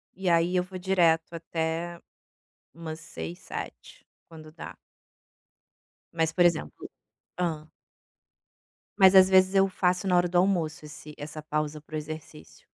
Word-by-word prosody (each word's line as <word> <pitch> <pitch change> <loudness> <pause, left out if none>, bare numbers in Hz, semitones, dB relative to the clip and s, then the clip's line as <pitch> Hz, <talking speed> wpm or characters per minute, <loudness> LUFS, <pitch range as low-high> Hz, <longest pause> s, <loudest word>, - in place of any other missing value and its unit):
e 190 -1 -1
aí 170 +1 +2
eu 180 - +2
vou 185 +1 -9
direto 170 -3 +2
até 165 +1 -3 0.7
umas 160 -1 -7
18h, 85 - -8
19h, - - -9 0.2
quando 155 -2 -13
dá. 160 - -9 1.4
Mas, 160 -1 0
por 175 0 +4
exemplo 165 - -1 0.5
hã? 160 -3 -2 1.3
Mas, 190 -1 +7
às 190 -1 +8
vezes, 190 0 +5
eu 195 0 +4
faço 185 0 0
na 180 - +3
hora 175 0 +3
do 175 - +1
almoço 175 -5 +1
esse 150 0 -10
essa 150 +1 -7
pausa 150 0 -3
pro 155 0 -7
exercício. 155 0 -9
165 Hz, 135 wpm, -27 LUFS, 155-180 Hz, 1.4 s, às